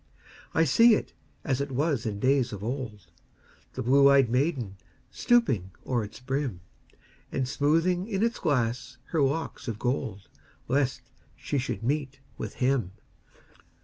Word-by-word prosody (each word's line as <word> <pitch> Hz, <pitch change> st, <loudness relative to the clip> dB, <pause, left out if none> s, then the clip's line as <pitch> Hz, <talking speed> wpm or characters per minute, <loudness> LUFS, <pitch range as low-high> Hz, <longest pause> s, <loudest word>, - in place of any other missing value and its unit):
I 160 Hz, -, +5 dB
see 225 Hz, -, +6 dB
it -, -, -4 dB, 0.3 s
as 135 Hz, -1 st, 0 dB
it 140 Hz, 0 st, -3 dB
was 135 Hz, -3 st, 0 dB
in 100 Hz, -2 st, -3 dB
days 130 Hz, +1 st, +2 dB
of 100 Hz, -1 st, -7 dB
old, 115 Hz, -5 st, -4 dB, 0.7 s
The -, -, -4 dB
blue 140 Hz, +3 st, +6 dB
ey'd 135 Hz, -4 st, +4 dB
maiden 125 Hz, -, 0 dB, 0.3 s
stooping 180 Hz, -, +2 dB, 0.2 s
o'er 120 Hz, -3 st, 0 dB
its 105 Hz, +1 st, -9 dB
brim, 130 Hz, -7 st, -3 dB, 0.7 s
And 130 Hz, -1 st, -1 dB
smoothing 165 Hz, +7 st, +1 dB
in 205 Hz, -2 st, -1 dB
its 230 Hz, 0 st, 0 dB
glass 125 Hz, -3 st, -1 dB
her 160 Hz, -, +1 dB
locks 140 Hz, +2 st, -1 dB
of 115 Hz, -3 st, -3 dB
gold, 110 Hz, -5 st, -2 dB, 0.4 s
Lest 135 Hz, +1 st, 0 dB, 0.3 s
she 145 Hz, -, -2 dB
should 125 Hz, -2 st, -4 dB
meet 135 Hz, +1 st, -1 dB, 0.2 s
with -, -, -6 dB
him. 125 Hz, -8 st, 0 dB
135 Hz, 145 wpm, -27 LUFS, 120-145 Hz, 0.7 s, see